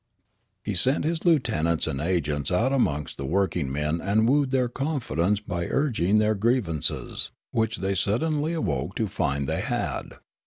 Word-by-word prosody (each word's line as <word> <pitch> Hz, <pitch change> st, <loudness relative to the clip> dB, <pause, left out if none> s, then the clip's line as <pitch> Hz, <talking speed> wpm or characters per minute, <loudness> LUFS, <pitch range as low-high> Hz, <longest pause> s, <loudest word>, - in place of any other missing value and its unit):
He 105 Hz, -, -2 dB
sent 130 Hz, -, +1 dB
his 165 Hz, +1 st, -1 dB
lieutenants 110 Hz, -, +2 dB
and 70 Hz, 0 st, -3 dB
agents 75 Hz, -5 st, 0 dB
out 115 Hz, +9 st, +2 dB
amongst 75 Hz, -, 0 dB
the 70 Hz, -, -5 dB
workiugmen 75 Hz, -3 st, 0 dB
and 110 Hz, +3 st, +2 dB
wooed 140 Hz, +1 st, +3 dB
their 130 Hz, -2 st, +2 dB
confidence 120 Hz, -, -1 dB
by 90 Hz, -5 st, -3 dB
urging 110 Hz, -, +1 dB
their 105 Hz, 0 st, +3 dB
grievances, 105 Hz, -, 0 dB, 0.2 s
which 115 Hz, 0 st, 0 dB
they 95 Hz, +1 st, -1 dB
suddenly 150 Hz, -, 0 dB
awoke 80 Hz, -, -2 dB
to 110 Hz, -, 0 dB
find 70 Hz, -7 st, -1 dB
they -, -, -1 dB
had. -, -, -3 dB
100 Hz, 150 wpm, -26 LUFS, 80-125 Hz, 0.2 s, wooed